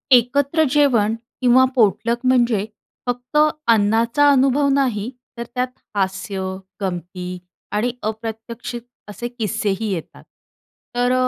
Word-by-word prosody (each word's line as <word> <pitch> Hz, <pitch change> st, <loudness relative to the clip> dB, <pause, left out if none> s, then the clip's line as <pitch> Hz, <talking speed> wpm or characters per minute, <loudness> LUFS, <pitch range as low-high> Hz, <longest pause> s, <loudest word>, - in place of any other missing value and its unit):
एकत्र 280 Hz, +6 st, +3 dB
जेवण 235 Hz, -7 st, +3 dB, 0.3 s
किंवा 255 Hz, +1 st, +6 dB
पॉटलक 225 Hz, 0 st, +2 dB
म्हणजे 240 Hz, -5 st, +3 dB, 0.4 s
फक्त 245 Hz, +4 st, -2 dB, 0.3 s
अन्नाचा 230 Hz, +6 st, +3 dB
अनुभव 275 Hz, +1 st, +3 dB
नाही. 245 Hz, -6 st, 0 dB, 0.3 s
तर 235 Hz, -, -3 dB
त्यात 250 Hz, 0 st, +1 dB, 0.3 s
हास्य, 190 Hz, 0 st, -1 dB, 0.4 s
गमती 180 Hz, 0 st, -4 dB, 0.3 s
आणि 220 Hz, +4 st, 0 dB
अप्रत्यक्षित 225 Hz, +2 st, -5 dB, 0.3 s
असे 235 Hz, +3 st, -5 dB
किस्सेही 215 Hz, -3 st, -2 dB
येतात. 170 Hz, -, -7 dB, 0.7 s
तर 245 Hz, +1 st, +2 dB
230 Hz, 100 wpm, -21 LUFS, 205-250 Hz, 0.7 s, किंवा